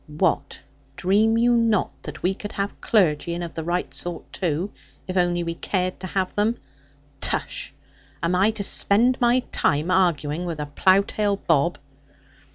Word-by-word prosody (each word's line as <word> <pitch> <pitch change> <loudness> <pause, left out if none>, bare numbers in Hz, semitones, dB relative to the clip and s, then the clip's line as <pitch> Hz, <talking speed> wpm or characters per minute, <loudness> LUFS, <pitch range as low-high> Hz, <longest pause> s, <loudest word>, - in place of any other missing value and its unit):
What, 155 +4 -1 0.4
dream 215 +7 +2
you 240 +1 +4
not 230 -4 +2
that 150 -1 -9
we 185 - +2
could 205 +1 -8
have 200 0 -4
clergy, 170 -5 +2
and 175 - -4
of 170 - -6
the 160 - -4
right 175 +2 -2
sort, 175 -2 -6
too, 175 +2 -1 0.4
if 185 - -4
only 175 -1 +1
we 170 0 -3
cared 185 +1 -2
to 185 - -5
have 185 0 -1
them? 220 +3 +1 0.6
Tush! - - -1 0.5
Am 170 +2 +1
I 190 +4 +4
to 220 -2 -2
spend 235 +6 +3
my 245 +1 +4
time 150 +5 +1
arguing 170 -3 +1
with 165 -3 -4
a 150 - -2
plough 185 +7 +3
tail 205 -1 0
Bob?' 165 -2 +1
185 Hz, 165 wpm, -23 LUFS, 170-205 Hz, 0.6 s, you